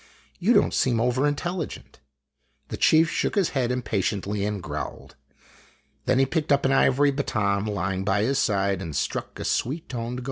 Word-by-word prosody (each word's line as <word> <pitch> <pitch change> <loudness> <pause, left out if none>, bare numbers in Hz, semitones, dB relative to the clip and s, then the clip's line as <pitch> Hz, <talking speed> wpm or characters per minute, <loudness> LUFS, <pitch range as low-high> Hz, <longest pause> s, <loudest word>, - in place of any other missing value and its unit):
You 210 +7 +3
don't 205 - +3
seem 120 -3 +2
over 125 +4 +2
intelligent." 165 - -4 0.7
The - - -4
chief 160 +1 +5
shook - - -1
his 195 -5 +2
head 125 -3 -1
impatiently 105 -4 -1
and 105 -1 -2
growled. 90 - -6 0.9
Then 130 0 +2
he 135 - +4
picked 155 +2 -2
up 140 -1 +3
an 135 - +3
ivory 135 +1 +4
baton 105 -7 -1
lying 95 -2 -2
by 100 +1 +1
his 135 +4 +1
side, 100 -2 +1
and 80 -6 -6
struck - - -3
a - - -4
sweet 150 +7 -1
toned 120 0 -4
gong. - - -4
125 Hz, 175 wpm, -25 LUFS, 100-145 Hz, 0.9 s, chief